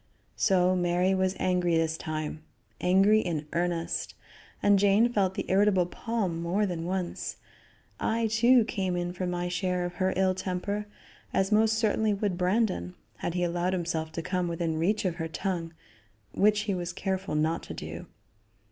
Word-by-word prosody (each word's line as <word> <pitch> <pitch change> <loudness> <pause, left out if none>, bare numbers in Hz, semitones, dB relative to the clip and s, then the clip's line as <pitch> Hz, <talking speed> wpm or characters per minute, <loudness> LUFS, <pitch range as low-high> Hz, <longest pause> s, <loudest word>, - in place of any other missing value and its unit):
So 185 -2 +3
Mary 180 +1 +2
was 190 0 +1
angry 180 -2 +1
this 160 -1 +1
time; 155 -1 -4 0.4
angry 195 +4 +5
in 165 -7 -2
earnest, 170 -1 -1 0.5
and 205 -1 +5
Jane 205 +4 +4
felt 190 -3 +1
the - - -3
irritable 195 -1 +3
palm 190 -3 -2
more 185 +5 +1
than 170 -4 -3
once. 185 -1 -3 0.6
I, 230 +1 0
too, 230 +2 +4
came 190 -5 -2
in 175 0 -2
for 180 0 -3
my 175 0 -2
share 180 0 -1
of 175 - -4
her 185 0 +3
ill 190 -1 +3
temper, 200 +3 -3 0.5
as 195 +2 +1
most 220 +1 +4
certainly 220 -1 +1
would 200 -2 -1
Brandon, 180 - 0 0.2
had 170 - -3
he 180 - +1
allowed 175 +1 0
himself 165 -3 -2
to 165 - -4
come 180 0 -1
within 165 -1 -2
reach 205 +5 +1
of 175 -2 -1
her 165 -2 -2
tongue, 170 -1 -3 0.6
which 210 - +3
he 210 -1 -1
was 175 -1 -3
careful 190 -3 -2
not 160 +2 +1
to - - -8
do. - - -7
185 Hz, 165 wpm, -28 LUFS, 175-200 Hz, 0.6 s, angry